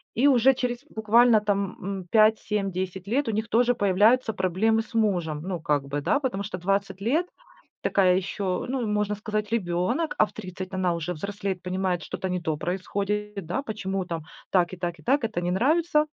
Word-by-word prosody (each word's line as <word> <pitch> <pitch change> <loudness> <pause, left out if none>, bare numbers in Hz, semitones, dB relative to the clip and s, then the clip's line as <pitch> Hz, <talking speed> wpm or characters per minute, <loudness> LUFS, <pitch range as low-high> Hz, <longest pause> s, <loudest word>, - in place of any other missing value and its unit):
И 270 +5 +4
уже 265 0 +5
через 245 +1 -2
буквально 220 +1 +4
там, 200 -2 -1
м, 190 -1 -4
5, 220 0 +5
7, 200 -2 -2
10 185 +1 -4
лет 265 +4 0
у - - +1
них 220 +2 -2
тоже 245 +2 +3
появляются 215 +4 +3
проблемы 215 +5 +1
с 225 - -13
мужем, 175 -9 +1
ну, 180 -3 -4
как 145 -3 0
бы, 145 +1 -2
да. 185 - +2
Потому 240 -8 -2
что 195 -2 -5
20 195 +1 -1
лет 300 - +1 0.6
такая 185 -2 +4
ещё, 190 -1 -2
ну, 255 -2 -1
можно 210 0 0
сказать, 210 0 -3
ребёнок, 190 - 0
а 215 - +5
в - - -15
30 185 -2 -7
она 185 -2 +1
уже 170 +2 -3
взрослеет, 195 +2 -4
понимает: 185 -1 -1
что-то 190 - -4
не 180 -1 -2
то 155 -2 -1
происходит, 200 +2 -3
да, 255 - -2
почему 195 -6 -3
там 165 -3 -5 0.3
так 180 -1 +2
и - - -6
так, 175 -2 -4
и - - -16
так, 280 - +2
это 220 -6 -2
не 175 0 -1
нравится. 300 - +2
200 Hz, 195 wpm, -26 LUFS, 180-225 Hz, 0.6 s, уже